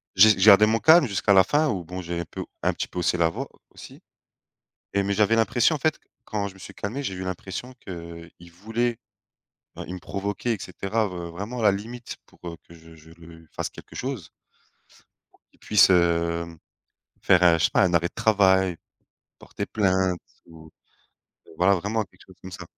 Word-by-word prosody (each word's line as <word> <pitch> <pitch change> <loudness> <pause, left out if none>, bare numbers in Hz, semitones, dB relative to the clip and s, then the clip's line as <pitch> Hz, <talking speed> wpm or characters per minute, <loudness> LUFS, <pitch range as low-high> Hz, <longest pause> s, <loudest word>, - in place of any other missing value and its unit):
J'ai 105 +3 +8
j'ai 95 - +2
gardé 105 0 +8
mon 115 +1 +2
calme 160 -1 +6
jusqu'à 100 0 +1
la 95 -1 +7
fin 150 +6 +1
ou 95 -7 -2
bon, 90 +2 -7
j'ai 85 0 -4
un 85 - -4
peu - - -7 0.2
un - - +2
petit - - -4
peu 90 - -6
haussé 90 +1 +1
la 85 -1 +3
voix, 80 - -6 0.2
aussi, - - -13 0.9
et 100 0 +1
mais 100 0 -1
j'avais 105 +2 +3
l'impression, 120 +6 +2
en - - -3
fait, 155 +2 0 0.2
quand 105 -2 -3
je 95 - -11
me 95 - -16
suis - - -11
calmé, 120 +8 -5
j'ai 95 - -3
eu 95 - -6
l'impression 95 +6 -6
qu'il 85 -1 -10
voulait 115 +6 -2 0.9
il 90 - -6
me - - -6
provoquait 100 +5 -3
et 105 - -7
cetera, 100 +4 -2
heu, 90 -3 -6
vraiment 105 +8 -6
à - - -3
la 105 -2 +5
limite 115 +4 -7
pour - - -24
heu, 85 -1 -6
que 85 - -14
je 80 0 -16
je 80 0 -17
le 80 -1 -15
fasse - - -4
quelque - - -13
chose 125 - -5 1.0
pour - - -29
qu'il - - -29
puisse, 105 -2 +4
hem, 85 -1 +1 0.6
faire 90 -1 +4
un 85 -2 +6
je 80 - +2
sais - - +2
pas, - - +3
un 90 - +1
arrêt 85 0 +2
de - - -43
travail, 95 -4 +3 0.6
porter - - -6
plainte 95 -4 +1 0.3
ou 80 -1 -14 0.8
heu, - - -15
voilà, 95 +2 +4
vraiment, 105 +4 -2
quelque - - -23
chose 95 - -17
comme 95 0 -10
ça. 90 -1 -8
95 Hz, 205 wpm, -24 LUFS, 85-110 Hz, 1.0 s, J'ai